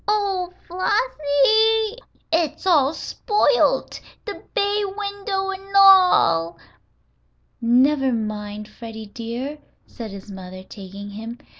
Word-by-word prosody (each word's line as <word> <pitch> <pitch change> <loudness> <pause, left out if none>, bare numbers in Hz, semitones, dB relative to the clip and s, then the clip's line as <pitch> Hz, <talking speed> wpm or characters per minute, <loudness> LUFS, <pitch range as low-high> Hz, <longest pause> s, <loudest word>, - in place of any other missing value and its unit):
"Oh, 395 -4 0 0.2
Flossie, 430 - +2 0.4
it's 330 +2 0
all 300 -7 +4
spoilt! 485 +8 +1 0.3
The 410 - -7
bay 410 +1 +1
window 400 -1 -3
an' 390 +1 -9
all!" 360 - +5 1.0
"Never 260 +3 +3
mind, 210 -2 -4
Freddie 225 -1 -9
dear," 240 +7 -6 0.3
said 230 -3 -9
his 200 +1 -10
mother, 185 -1 -9
taking 200 +1 -10
him. 225 +3 -8
295 Hz, 100 wpm, -22 LUFS, -, 1.0 s, all